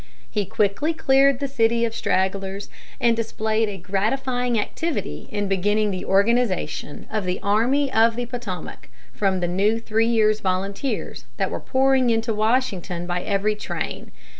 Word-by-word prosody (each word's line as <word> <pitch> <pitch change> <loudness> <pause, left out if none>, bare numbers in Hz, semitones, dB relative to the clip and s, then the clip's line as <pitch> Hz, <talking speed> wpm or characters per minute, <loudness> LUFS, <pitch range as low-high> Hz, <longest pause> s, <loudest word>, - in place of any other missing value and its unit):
He 210 -2 -1
quickly 210 - 0
cleared 275 -3 +4
the 280 - -1
city 235 -2 +2
of 225 - -3
stragglers, 195 0 -1 0.3
and 235 -1 +3
displayed 220 -1 0
a 200 - -5
gratifying 235 +6 0
activity 210 - -3
in 205 -1 -1
beginning 205 +2 +1
the 185 - -4
organization 200 -7 +1
of 215 -2 -1
the 180 0 -2
Army 255 +7 +2
of 225 +1 +4
the 245 0 -2
Potomac 235 -7 -7 0.2
from 190 -3 0
the 175 - +1
new 200 +6 +1
three 225 0 +1
years' 215 -2 +3
volunteers 195 +7 -2
that - - -1
were - - -3
pouring 265 -1 +2
into 225 0 +1
Washington 210 -6 0
by 175 0 -2
every 200 +2 0
train. 210 - -5
215 Hz, 150 wpm, -23 LUFS, 195-240 Hz, 0.3 s, cleared